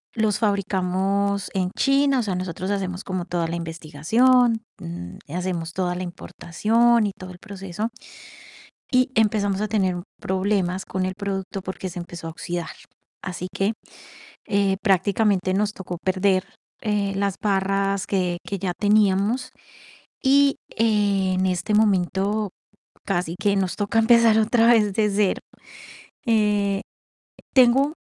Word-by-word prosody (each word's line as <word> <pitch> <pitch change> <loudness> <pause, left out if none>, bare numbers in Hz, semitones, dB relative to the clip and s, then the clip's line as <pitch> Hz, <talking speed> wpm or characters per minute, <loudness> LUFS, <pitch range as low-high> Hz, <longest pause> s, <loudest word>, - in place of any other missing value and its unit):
los 215 -2 +1
fabricamos 200 -1 0
en 185 -2 0
China, 275 -1 +3
o - - 0
sea, 195 -4 -2
nosotros 185 +1 -3
hacemos 190 -2 -3
como 185 -2 -3
toda 175 -2 -1
la 165 - -3
investigación, 175 - +2 0.2
mm, 85 +1 -7 0.2
hacemos 175 -2 -3
toda 180 -1 -1
la 180 - -4
importación, 220 +6 +1
y - - -3
todo 185 -1 -9
el 180 - -11
proceso. 200 +1 -5 1.0
Y 255 0 +3
empezamos 205 -4 +1
a 215 - -1
tener 190 -4 +1
m 175 - -5 0.2
problemas 190 -1 0
con 185 0 -2
el 185 - -3
producto, 195 -1 -4
porque 185 0 -5
se 180 - -7
empezó 170 -1 -8
a - - -4
oxidar. 175 +1 -5 0.6
Así 180 0 -5
que, 195 +3 0 0.8
eh, 200 -2 +1
prácticamente, 195 -1 +2
nos 205 +2 +1
tocó 180 -3 -6
perder, 185 0 +2 0.4
eh, 205 -2 0
las 200 -1 0
barras 195 -1 0
que 180 -3 0
que 200 - -3
ya 180 -1 -2
teníamos, 210 +5 +2 0.7
y, 280 +1 +4 0.2
eh, 205 -4 +2
en 185 - +1
este 180 +2 -1
momento, 205 0 +1 0.6
casi 175 -3 -1
que 200 +1 +2
nos 190 -2 0
toca, 210 +2 +1
empezar 225 -1 +5
otra 225 +1 +3
vez, 215 -4 +4
de 210 +1 +2
0. 200 -1 +1 0.9
Eh, 210 -3 +2 0.7
tengo 265 +3 +5
195 Hz, 140 wpm, -23 LUFS, 185-215 Hz, 1.0 s, empezar